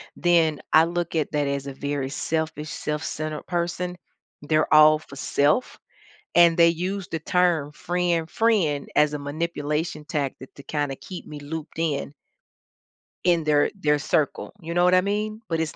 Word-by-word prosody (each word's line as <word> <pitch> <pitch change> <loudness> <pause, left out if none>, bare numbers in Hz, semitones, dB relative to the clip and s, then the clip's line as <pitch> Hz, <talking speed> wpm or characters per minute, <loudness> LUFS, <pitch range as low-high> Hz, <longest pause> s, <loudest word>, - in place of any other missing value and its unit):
then 165 -4 +2
I 160 +1 +7
look 170 0 -3
at 155 -2 0
that 145 -1 +1
as 140 0 -3
a 140 - -5
very 140 0 -3
selfish, 155 +1 -3
self-centered 150 0 -4
person, 180 0 -2 0.5
they're 155 +1 +1
all 155 0 +8
for 145 -3 -13
self, 145 - +1 0.6
and 170 -1 +6
they 170 -1 +7
use 180 +3 -3
the 160 - -3
term 165 -3 +1
frien 175 0 -1
"friend" 175 -11 +1
as 150 0 +4
a 150 - -3
manipulation 150 +1 -3
tactic 140 -3 -4
to 140 - -12
kinda 145 -3 -2
keep 180 +5 -9
me 150 - -8
looped 160 +2 -7
in 145 -3 -1 1.1
in 170 -2 +3
their 150 -1 +3
their 150 -6 +1
circle, 150 0 -1
you 165 0 -5
know 175 +1 +3
what 180 - +4
I 185 - +5
mean? 210 +3 -2
But 165 - 0
it's 160 -2 -2
160 Hz, 165 wpm, -24 LUFS, 150-175 Hz, 1.1 s, all